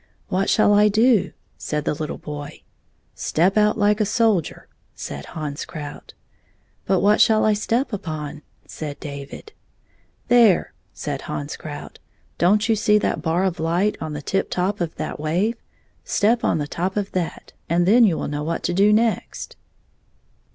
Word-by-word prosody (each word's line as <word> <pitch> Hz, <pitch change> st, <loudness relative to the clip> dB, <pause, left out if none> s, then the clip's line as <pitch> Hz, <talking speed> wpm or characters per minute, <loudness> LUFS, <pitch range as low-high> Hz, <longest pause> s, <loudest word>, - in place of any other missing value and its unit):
'' -, -, -40 dB
What 195 Hz, +1 st, +1 dB
shall 205 Hz, -1 st, +4 dB
I 210 Hz, +1 st, +6 dB
do 220 Hz, +1 st, +4 dB
1" -, -, -14 dB, 0.3 s
said 150 Hz, -1 st, -3 dB
the -, -, +1 dB
little 155 Hz, 0 st, -4 dB
boy. 145 Hz, -1 st, -8 dB, 0.3 s
" -, -, -42 dB, 0.2 s
Step 180 Hz, +5 st, +1 dB
out 210 Hz, 0 st, +3 dB
like 210 Hz, 0 st, +2 dB
a -, -, +5 dB
soldier," 215 Hz, -5 st, 0 dB, 0.3 s
said 70 Hz, -1 st, -7 dB
Hans 150 Hz, -2 st, -4 dB
Krout. 145 Hz, -2 st, -9 dB, 0.3 s
" -, -, -41 dB
But 190 Hz, -1 st, +2 dB
what 210 Hz, +2 st, +4 dB
shall 220 Hz, -1 st, +4 dB
I 215 Hz, -, +4 dB
step 230 Hz, +5 st, -1 dB
upon 155 Hz, -7 st, -4 dB
1 -, -, -15 dB, 0.2 s
" -, -, -39 dB
said 150 Hz, -2 st, -7 dB
David. 140 Hz, -, -8 dB, 0.4 s
" -, -, -39 dB
There," 235 Hz, -6 st, +4 dB, 0.2 s
said -, -, -5 dB
Hans 75 Hz, -1 st, -4 dB
Krout, -, -, -9 dB, 0.2 s
" -, -, -39 dB
don't 210 Hz, +5 st, +3 dB
you 225 Hz, -, +3 dB
see 210 Hz, 0 st, +3 dB
that 210 Hz, -, -1 dB
bar 170 Hz, +3 st, 0 dB
of 185 Hz, -3 st, -1 dB
light 175 Hz, +6 st, +1 dB
on 155 Hz, -1 st, -4 dB
the 150 Hz, 0 st, -6 dB
tip 195 Hz, +6 st, -1 dB
top 185 Hz, +2 st, -1 dB
of 165 Hz, -2 st, -2 dB
that -, -, -5 dB
wave 180 Hz, +10 st, 0 dB
1 -, -, -39 dB, 0.4 s
Step 225 Hz, +3 st, +2 dB
on -, -, +2 dB
the 150 Hz, -, -2 dB
top 180 Hz, +6 st, -3 dB
of 200 Hz, -1 st, -2 dB
that, 175 Hz, -3 st, -4 dB, 0.2 s
and 170 Hz, +1 st, +2 dB
then 230 Hz, +6 st, +6 dB
you 185 Hz, -7 st, +3 dB
will -, -, -3 dB
know 145 Hz, 0 st, -3 dB
what 165 Hz, +2 st, -3 dB
to 175 Hz, -, 0 dB
do 200 Hz, +3 st, +4 dB
next." 225 Hz, +1 st, 0 dB
190 Hz, 195 wpm, -22 LUFS, 155-210 Hz, 0.4 s, I